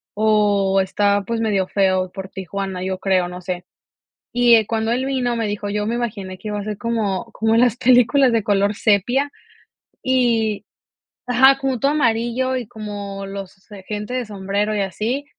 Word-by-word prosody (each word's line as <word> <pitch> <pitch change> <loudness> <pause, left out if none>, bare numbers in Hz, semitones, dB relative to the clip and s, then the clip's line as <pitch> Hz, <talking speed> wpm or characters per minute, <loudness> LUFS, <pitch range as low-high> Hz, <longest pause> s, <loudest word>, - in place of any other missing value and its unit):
o 205 -2 +3
está, 200 +1 +1
pues, 230 +2 -2
medio 200 -4 +1
feo 185 -2 +1
por 190 0 -7
Tijuana, 190 0 -5
yo 190 0 -2
creo, 185 -2 +1
no 180 0 -8
sé. 180 0 -5 0.7
Y, 240 -1 +5
eh, 220 -1 +3
cuando 225 +1 -1
él 255 +2 0
vino 255 -3 -1
me 230 -1 -1
dijo: 205 0 -3
"Yo 210 0 -1
me 230 +2 -1
imaginé 200 -6 -4
que 215 - -8
iba 210 0 -3
a - - -5
ser 210 0 -4
como 230 -3 -1
como 225 0 +1
las 240 -1 +4
películas 255 +1 +4
de 230 -1 +2
color 200 0 +2
sepia", 240 +8 +2 0.7
y 230 -6 +1 0.6
ajá, 265 +2 +5
como 270 -2 -1
todo 275 - +3
amarillo 245 -1 +1
y 250 -3 -4
como 205 -3 -6
los, 195 0 -9
eh, 195 -2 -10
gente 210 +3 -4
de 255 -1 -1
sombrero 205 +1 -2
y 210 - 0
así, 215 +8 -2
210 Hz, 180 wpm, -20 LUFS, 195-240 Hz, 0.7 s, Y